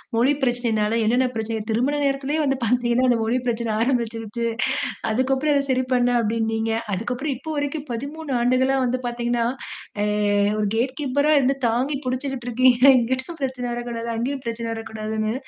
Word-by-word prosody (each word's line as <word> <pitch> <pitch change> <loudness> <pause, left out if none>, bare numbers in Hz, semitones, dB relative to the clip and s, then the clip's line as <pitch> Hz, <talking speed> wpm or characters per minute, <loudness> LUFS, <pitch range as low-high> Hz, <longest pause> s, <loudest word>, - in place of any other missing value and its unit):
மொழி 250 +5 +4
பிரச்சனனாலே 230 -3 +1
என்னென்ன 245 +4 +3
பிரச்சனைக 220 -1 -2
திருமண 250 +6 +1
நேரத்திலயே 275 +2 0
வந்து 270 -2 +1
பாத்தீங்கன்னா, 240 +1 +2
அந்த 240 - +4
மொழி 235 +3 +1
பிரச்சன 230 -1 -1
ஆரம்பிச்சுருச்சு. 235 -2 -1 0.7
அதுக்கப்றம் 265 +5 +1
அத 280 -1 +2
சரி 255 0 +2
பண்ணேன் 245 -1 +3
அப்டீன்னீங்க. 225 0 0 0.2
அதுக்கப்றம் 245 +8 -2
இப்போ 315 +4 -9
வரைக்கும் 290 +1 -3
13 260 -1 0
வந்து 250 +1 0
பாத்தீங்கன்னா, 240 0 -1 0.6
அ - - +2 0.5
ஒரு 210 - +1
கேட் 255 +3 0
கீப்பரா 285 +2 +1
இருந்து 270 0 +2
தாங்கி 255 +5 0
புடிச்சுக்கிட்டு 255 -1 -3
இருக்கீங்க, 250 +1 +3 0.2
இங்கிட்டும் 260 +7 -2
பிரச்சன 260 -2 -2
வரக்கூடாது 235 -1 -4
அங்கயும் 260 +4 -2
பிரச்சன 230 0 -3
வரக்கூடாதுனு. 220 -1 -3
245 Hz, 145 wpm, -23 LUFS, 230-270 Hz, 0.7 s, மொழி